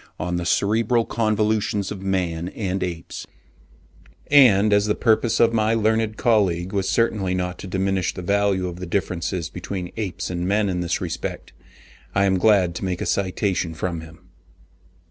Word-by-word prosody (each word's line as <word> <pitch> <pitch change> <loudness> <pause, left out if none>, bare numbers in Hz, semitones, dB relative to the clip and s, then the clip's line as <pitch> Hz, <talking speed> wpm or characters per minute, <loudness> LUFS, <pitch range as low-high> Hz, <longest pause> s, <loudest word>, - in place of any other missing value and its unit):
on 90 0 -2
the 85 -1 -3
cerebral 115 +5 +2
convolutions 110 -2 0
of 100 -2 -6
man 90 -3 -1
and 95 -3 -2
apes; 85 -3 -5 1.0
and 110 -8 +6
as 100 +1 +3
the 105 - +1
purpose 115 -1 +2
of 115 0 +4
my 110 0 +2
learned 110 0 +1
colleague 95 -5 +1
was 95 -1 0
certainly 105 -5 +1
not 90 -1 -3
to - - -7
diminish 95 0 0
the 90 - -8
value 100 -1 +1
of 90 -1 -6
the 90 0 -6
differences 85 -2 -2
between 90 +1 -6
apes 100 -4 -4
and 90 0 -2
men 100 +1 +1
in 90 -1 -1
this 85 - -1
respect, - - -5 0.6
I 100 0 +3
am 95 -1 +2
glad 95 -4 +4
to - - -6
make 90 -2 -2
a - - -3
citation 95 -3 -1
from 85 0 -3
him. 80 0 -15
95 Hz, 165 wpm, -22 LUFS, 90-105 Hz, 1.0 s, and